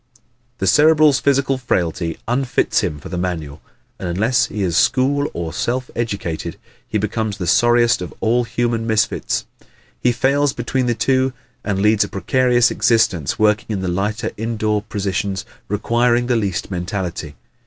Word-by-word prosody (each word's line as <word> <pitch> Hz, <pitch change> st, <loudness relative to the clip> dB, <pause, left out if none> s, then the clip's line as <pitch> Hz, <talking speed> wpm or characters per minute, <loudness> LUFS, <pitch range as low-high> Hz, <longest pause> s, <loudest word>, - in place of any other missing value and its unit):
The 95 Hz, -, -2 dB
Cerebral's 150 Hz, -, +5 dB
physical 135 Hz, -1 st, +1 dB
frailty 85 Hz, -8 st, -1 dB
unfits 125 Hz, +2 st, +1 dB
him 75 Hz, -, -2 dB
for -, -, -10 dB
the 90 Hz, 0 st, -3 dB
manual 80 Hz, -5 st, -4 dB, 0.4 s
and 90 Hz, -, -4 dB
unless 110 Hz, +8 st, +2 dB
he 105 Hz, -, -3 dB
is 85 Hz, -3 st, 0 dB
school 140 Hz, -, +2 dB
or 85 Hz, -2 st, -5 dB
self 125 Hz, +1 st, -2 dB
educated 100 Hz, -8 st, -3 dB, 0.3 s
he 110 Hz, -, -1 dB
becomes 105 Hz, 0 st, -2 dB
the 90 Hz, -, -4 dB
sorriest 120 Hz, +4 st, +3 dB
of 90 Hz, -, -5 dB
all 120 Hz, +2 st, +2 dB
human 115 Hz, -1 st, -1 dB
misfits. 110 Hz, -2 st, 0 dB, 0.5 s
He 125 Hz, -, +2 dB
falls 135 Hz, +3 st, +1 dB
between 125 Hz, +1 st, -1 dB
the 120 Hz, -, +1 dB
two 130 Hz, +1 st, +1 dB, 0.3 s
and 100 Hz, -2 st, -1 dB
leads 105 Hz, 0 st, +4 dB
a -, -, -4 dB
precarious 120 Hz, +4 st, +2 dB
existence 110 Hz, -, +1 dB
working 105 Hz, +1 st, +2 dB
in 100 Hz, -3 st, -2 dB
the 95 Hz, -, -2 dB
lighter 100 Hz, +4 st, -1 dB
indoor 110 Hz, -1 st, -1 dB
positions 100 Hz, -2 st, -3 dB, 0.2 s
requiring 120 Hz, +4 st, +1 dB
the 125 Hz, 0 st, +1 dB
least 100 Hz, -4 st, -2 dB
mentality. 90 Hz, -4 st, -4 dB
110 Hz, 155 wpm, -19 LUFS, 95-125 Hz, 0.5 s, Cerebral's